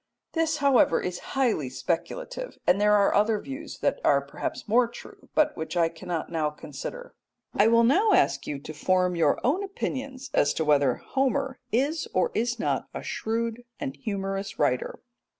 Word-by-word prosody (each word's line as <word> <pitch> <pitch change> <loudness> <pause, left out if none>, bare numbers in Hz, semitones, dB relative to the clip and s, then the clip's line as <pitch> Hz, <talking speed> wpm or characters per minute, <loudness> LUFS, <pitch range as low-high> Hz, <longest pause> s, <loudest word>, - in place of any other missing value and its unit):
This, 320 -2 +1
however, 280 -3 +4
is 180 -1 -3 0.2
highly 220 - +1
speculative, - - -4
and 190 +3 +3
there 210 0 +5
are 200 -1 +4
other 210 +1 +3
views 275 +7 -7
that - - +1
are - - +5
perhaps - - -5
more 235 +3 +4
true, 235 - -13
but 310 -1 +3
which 160 +2 -4
I 165 -1 +3
cannot 165 0 -5
now 160 -2 0
consider. 150 - -8 0.4
I 205 - +4
will 230 +1 +5
now 375 - +4
ask 140 - +2
you 145 - -3
to 155 - -8
form 180 +3 +1
your 160 -4 +2
own 325 +11 +2
opinions 275 -8 -5
as 145 - +3
to 160 - 0
whether 145 -4 +4
Homer 270 0 -1
is 285 +7 0
or 185 - +2
is 235 +2 0
not - - -1
a - - -5
shrewd 230 +1 -2 0.2
and 280 -3 -4
humorous 195 -4 -4
writer. 130 -4 0
220 Hz, 170 wpm, -27 LUFS, 170-275 Hz, 0.4 s, there